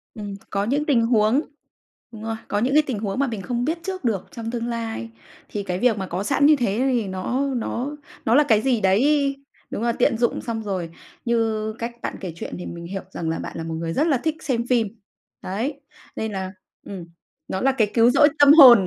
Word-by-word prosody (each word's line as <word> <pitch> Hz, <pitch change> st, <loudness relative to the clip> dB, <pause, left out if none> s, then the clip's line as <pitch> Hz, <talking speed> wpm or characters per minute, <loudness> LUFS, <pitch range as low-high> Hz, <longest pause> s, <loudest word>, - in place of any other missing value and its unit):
Ừm, 205 Hz, -2 st, -6 dB
có 200 Hz, 0 st, 0 dB
những 280 Hz, +8 st, 0 dB
tình 255 Hz, -6 st, +3 dB
huống 230 Hz, +3 st, +3 dB, 0.7 s
đúng 220 Hz, -1 st, -10 dB
rồi, 225 Hz, 0 st, -2 dB
có 205 Hz, -, 0 dB
những 255 Hz, +5 st, +1 dB
cái 305 Hz, +1 st, +6 dB
tình 235 Hz, -7 st, -2 dB
huống 205 Hz, +3 st, -2 dB
mà 280 Hz, -, +2 dB
mình 220 Hz, -4 st, -4 dB
không 240 Hz, +5 st, -2 dB
biết 320 Hz, +4 st, 0 dB
trước 375 Hz, -2 st, -4 dB
được 220 Hz, -7 st, -1 dB
trong 230 Hz, 0 st, -5 dB
tương 235 Hz, -1 st, -3 dB
lai. 225 Hz, -, -4 dB, 0.4 s
Thì 205 Hz, -, -3 dB
cái 180 Hz, -2 st, -3 dB
việc 230 Hz, -1 st, +3 dB
mà 190 Hz, -2 st, -3 dB
có 180 Hz, +3 st, -3 dB
sẵn 275 Hz, +6 st, +2 dB
như 305 Hz, +1 st, +7 dB
thế 230 Hz, -7 st, 0 dB
thì 230 Hz, -5 st, 0 dB
nó 250 Hz, +9 st, -1 dB
nó 250 Hz, +4 st, -3 dB, 0.3 s
nó 230 Hz, -, +4 dB
là 295 Hz, -, +7 dB
cái 220 Hz, -4 st, +4 dB
gì 245 Hz, -3 st, +1 dB
đấy, 275 Hz, +9 st, +3 dB, 0.3 s
đúng -, -, -4 dB
rồi, 235 Hz, 0 st, +2 dB
tiện 240 Hz, -1 st, +3 dB
dụng 235 Hz, +1 st, +1 dB
xong 225 Hz, -2 st, -4 dB
rồi, 185 Hz, -5 st, -3 dB, 0.4 s
như 220 Hz, -2 st, 0 dB
cách 235 Hz, +1 st, -3 dB
bạn -, -, -4 dB
kể 180 Hz, -4 st, -5 dB
chuyện -, -, -6 dB
thì 180 Hz, -, -6 dB
mình 170 Hz, 0 st, -7 dB
hiểu 195 Hz, +1 st, -4 dB
rằng 165 Hz, -, -3 dB
là 165 Hz, -, -2 dB
bạn -, -, -6 dB
là 165 Hz, -, -4 dB
một 165 Hz, 0 st, -4 dB
người 165 Hz, 0 st, -3 dB
rất 300 Hz, -, +2 dB
là 290 Hz, -5 st, +3 dB
thích 315 Hz, +5 st, -1 dB
xem 240 Hz, -4 st, -1 dB
phim. 240 Hz, -3 st, +2 dB, 0.5 s
Đấy, 245 Hz, +10 st, -3 dB, 0.3 s
nên 220 Hz, 0 st, -3 dB
là, 190 Hz, -2 st, -4 dB, 0.3 s
ừm, 185 Hz, -4 st, -7 dB, 0.4 s
nó 190 Hz, -, -3 dB
là 270 Hz, -, +4 dB
cái 220 Hz, -6 st, +1 dB
cứu 230 Hz, 0 st, +6 dB
rỗi 290 Hz, +4 st, +6 dB
tâm 285 Hz, 0 st, +9 dB
hồn. 250 Hz, -, +10 dB
230 Hz, 230 wpm, -23 LUFS, 200-265 Hz, 0.7 s, hồn